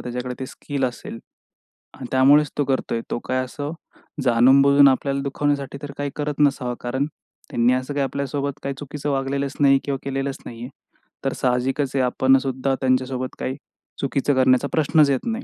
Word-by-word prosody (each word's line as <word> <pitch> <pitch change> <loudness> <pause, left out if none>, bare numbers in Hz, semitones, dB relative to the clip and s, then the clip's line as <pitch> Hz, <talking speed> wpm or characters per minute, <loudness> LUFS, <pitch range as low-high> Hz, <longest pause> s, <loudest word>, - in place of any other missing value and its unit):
त्याच्याकडे 125 +1 -4
ते 130 - -3
स्किल 140 +1 -4
असेल. 120 -2 -5 0.8
आणि - - -8
त्यामुळेच 140 +3 +5
तो 145 - +1
करतोय, 130 -3 -1
तो - - -1
काय 130 0 0
असं 145 +3 -5 0.5
जाणून-बुजून 135 +4 +6
आपल्याला 140 +1 +1
दुखवण्यासाठी 140 0 -2
तर 145 - -6
काही 145 0 -2
करत 150 -1 -3
नसावा, 135 -4 +2
कारण 130 +3 -1 0.4
त्यांनी 120 +1 +2
असं 130 +3 -2
काही 140 -1 0
आपल्यासोबत 140 +1 -3
काही 140 0 -3
चुकीचं 145 0 -5
वागलेलंच 140 +1 -1
नाही 135 -1 +5
किंवा 140 -1 -2
केलेलंच 135 0 -3
नाही 115 -1 -9
आहे. 125 - -6 0.6
तर 135 - 0
साहजिकच 130 +2 0
आहे, 135 - +2
आपण 130 +2 +3
सुद्धा 135 0 -1
त्यांच्यासोबत 130 0 0
काही 130 - -3 0.4
चुकीचं 140 +1 0
करण्याचा 130 +1 +3
प्रश्नच 155 -1 +3
येत 135 -2 0
नाही. 230 +2 -2
135 Hz, 165 wpm, -22 LUFS, 130-140 Hz, 0.8 s, जाणून-बुजून